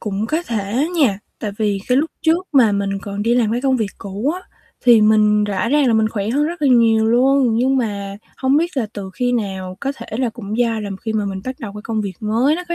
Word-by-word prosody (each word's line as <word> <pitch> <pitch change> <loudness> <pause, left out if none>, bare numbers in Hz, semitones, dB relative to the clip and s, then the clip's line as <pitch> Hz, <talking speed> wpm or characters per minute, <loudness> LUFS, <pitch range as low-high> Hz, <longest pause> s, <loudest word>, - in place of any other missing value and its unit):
cũng 210 0 -3
có 315 +8 -1
thể 230 - -1
nha, 230 -11 +3 0.2
tại 210 - -3
vì 210 -2 0
cái 250 - +3
lúc 310 +2 0
trước 340 +2 +2
mà 245 -7 +5
mình 200 0 -1
còn 200 0 -4
đi 235 +2 +2
làm 230 -3 +2
cái 240 - -1
công 265 0 +2
việc 220 -4 -2
cũ 200 +8 -3
á 365 - -7 0.4
thì 235 -3 +7
mình 210 -1 +4
rõ 205 +1 -1
ràng 290 +1 +3
là 240 - +3
mình 220 0 +2
khỏe 210 -1 -3
hơn 285 +5 +1
rất 335 -1 -5
là 285 - +4
nhiều 230 -3 +4
luôn. 250 +1 +3
Nhưng 260 +3 +2
mà 200 -5 -3 0.2
hông 265 +1 +2
biết 335 +1 0
là 245 -5 0
từ 195 -2 -7
khi 245 +4 0
nào, 190 -5 -3
có 275 0 -2
thể - - -9
là 255 -2 +1
cũng 220 -1 -6
do 230 -2 +1
là 205 -1 -5
khi 220 - -3
mà 215 -1 0
mình 195 -1 -4
bắt 255 0 -4
đầu 210 -3 -6
cái 210 - -8
công 225 -1 -2
việc 200 -2 -3
mới 230 +7 +2
nó 360 - -5
có 345 - -1
225 Hz, 265 wpm, -19 LUFS, 205-260 Hz, 0.4 s, thì